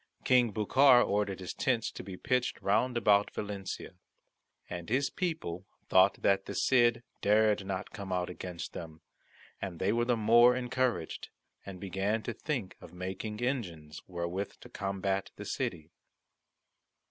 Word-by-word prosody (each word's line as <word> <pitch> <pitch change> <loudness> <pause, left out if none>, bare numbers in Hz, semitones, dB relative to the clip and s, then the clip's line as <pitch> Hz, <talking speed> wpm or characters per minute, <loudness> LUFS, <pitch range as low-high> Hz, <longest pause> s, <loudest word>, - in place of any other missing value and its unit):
King 125 -3 +4
Bucar 125 +5 +5
ordered 100 -2 -1
his 95 - -5
tents 125 -5 0
to - - -8
be 95 -2 -8
pitched 125 0 0
round 120 +5 +1
about 105 -2 +4
Valencia. 100 -2 -5 0.8
And 85 +1 -6
his 135 +4 +1
people 130 - -3 0.2
thought 95 +1 +4
that 95 0 +2
the - - -5
Cid 120 -2 +3 0.2
dared 105 -1 +3
not 95 +1 -4
come 100 -2 -7
out 90 -1 0
against 90 -1 -6
them, 80 -1 -8 0.6
and 95 -4 -4
they 95 +5 +1
were 120 0 +1
the 120 -1 +2
more 120 +3 +6
encouraged, 125 0 -1 0.4
and 95 -2 -7
began 100 +3 -1
to 120 - -3
think 120 -6 -4
of - - -12
making 95 +4 -5
engines 90 - -3
wherewith 90 +2 -3
to - - -12
combat 95 0 -2
the - - -8
city. 80 -1 -3
100 Hz, 145 wpm, -31 LUFS, 95-120 Hz, 0.8 s, more